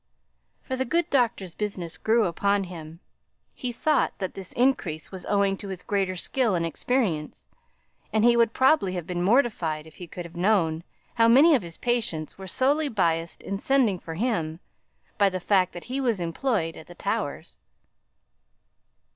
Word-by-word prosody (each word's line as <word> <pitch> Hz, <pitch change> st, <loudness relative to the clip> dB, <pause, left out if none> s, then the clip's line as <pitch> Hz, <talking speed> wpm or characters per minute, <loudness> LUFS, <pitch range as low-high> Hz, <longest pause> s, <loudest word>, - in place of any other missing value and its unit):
For 260 Hz, -, -3 dB
the 260 Hz, -, 0 dB
good 335 Hz, +6 st, 0 dB
doctor's 235 Hz, -, +1 dB
business 185 Hz, -5 st, -4 dB
grew 225 Hz, +1 st, +2 dB
upon 200 Hz, +3 st, +1 dB
him. 165 Hz, -2 st, -9 dB, 0.5 s
He 250 Hz, -, -4 dB
thought 300 Hz, +4 st, +1 dB
that 190 Hz, -, -4 dB
this 190 Hz, -2 st, -7 dB
increase 215 Hz, -, 0 dB
was 190 Hz, -2 st, -7 dB
owing 200 Hz, -1 st, +2 dB
to 200 Hz, -, -8 dB
his 190 Hz, -2 st, -6 dB
greater 195 Hz, -2 st, -1 dB
skill 225 Hz, +3 st, 0 dB
and 170 Hz, -1 st, 0 dB
experience, 170 Hz, -4 st, -2 dB, 0.6 s
and 220 Hz, -1 st, +2 dB
he 240 Hz, 0 st, +6 dB
would 235 Hz, -1 st, +4 dB
probably 260 Hz, -7 st, +3 dB
have 175 Hz, -3 st, -4 dB
been 175 Hz, 0 st, -3 dB
mortified 185 Hz, -, +1 dB
if 160 Hz, -, -16 dB
he 180 Hz, -, -8 dB
could 175 Hz, +1 st, -7 dB
have 170 Hz, 0 st, -12 dB
known 170 Hz, -4 st, +1 dB, 0.3 s
how 230 Hz, -1 st, +4 dB
many 280 Hz, +8 st, +7 dB
of 265 Hz, -, +3 dB
his 170 Hz, -2 st, -8 dB
patients 220 Hz, -11 st, -1 dB
were 190 Hz, 0 st, -9 dB
solely 285 Hz, +8 st, +2 dB
biassed 170 Hz, -6 st, -1 dB
in 195 Hz, 0 st, -4 dB
sending 240 Hz, -7 st, +2 dB
for 165 Hz, -1 st, -7 dB
him, 170 Hz, -7 st, -1 dB, 0.6 s
by 200 Hz, -1 st, +5 dB
the 185 Hz, -1 st, -3 dB
fact 185 Hz, 0 st, +2 dB
that 175 Hz, -, -8 dB
he 265 Hz, +2 st, -3 dB
was 235 Hz, -7 st, +1 dB
employed 170 Hz, 0 st, -1 dB
at 160 Hz, -, -11 dB
the 175 Hz, -, -12 dB
Towers. -, -, -4 dB
195 Hz, 170 wpm, -26 LUFS, 170-240 Hz, 0.6 s, many